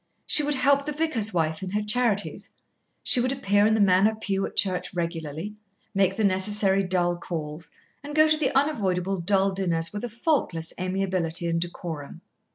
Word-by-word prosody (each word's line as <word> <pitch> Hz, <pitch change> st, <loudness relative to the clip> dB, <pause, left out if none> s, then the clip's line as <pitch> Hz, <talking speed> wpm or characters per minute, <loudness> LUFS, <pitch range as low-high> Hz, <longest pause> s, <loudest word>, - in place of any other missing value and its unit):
She -, -, +3 dB
would 295 Hz, 0 st, 0 dB
help 280 Hz, +2 st, +2 dB
the 300 Hz, -, -2 dB
vicar's 290 Hz, -9 st, 0 dB
wife 160 Hz, -3 st, -1 dB
in 190 Hz, -, -4 dB
her 210 Hz, +2 st, -1 dB
charities, 210 Hz, -2 st, 0 dB, 0.5 s
she 255 Hz, -, +5 dB
would 255 Hz, +1 st, +1 dB
appear 205 Hz, -6 st, +2 dB
in 220 Hz, -, +3 dB
the -, -, 0 dB
Manor 200 Hz, +2 st, +4 dB
pew 195 Hz, -3 st, -2 dB
at -, -, -13 dB
church 185 Hz, -2 st, 0 dB
regularly, 165 Hz, +2 st, -4 dB, 0.4 s
make 195 Hz, -1 st, +2 dB
the 220 Hz, -, -1 dB
necessary 195 Hz, 0 st, +2 dB
dull 180 Hz, -1 st, 0 dB
calls, 160 Hz, -2 st, -6 dB, 0.4 s
and 295 Hz, +1 st, -7 dB
go 310 Hz, 0 st, +6 dB
to 310 Hz, -, +4 dB
the 300 Hz, -3 st, 0 dB
unavoidable 195 Hz, -, 0 dB
dull 195 Hz, +2 st, +2 dB
dinners 170 Hz, -4 st, -1 dB
with 205 Hz, -, -5 dB
a 245 Hz, -, -3 dB
faultless 230 Hz, -, -1 dB
amiability 185 Hz, -2 st, -1 dB
and 165 Hz, 0 st, 0 dB
decorum. 165 Hz, -4 st, -6 dB
195 Hz, 175 wpm, -25 LUFS, 175-225 Hz, 0.5 s, go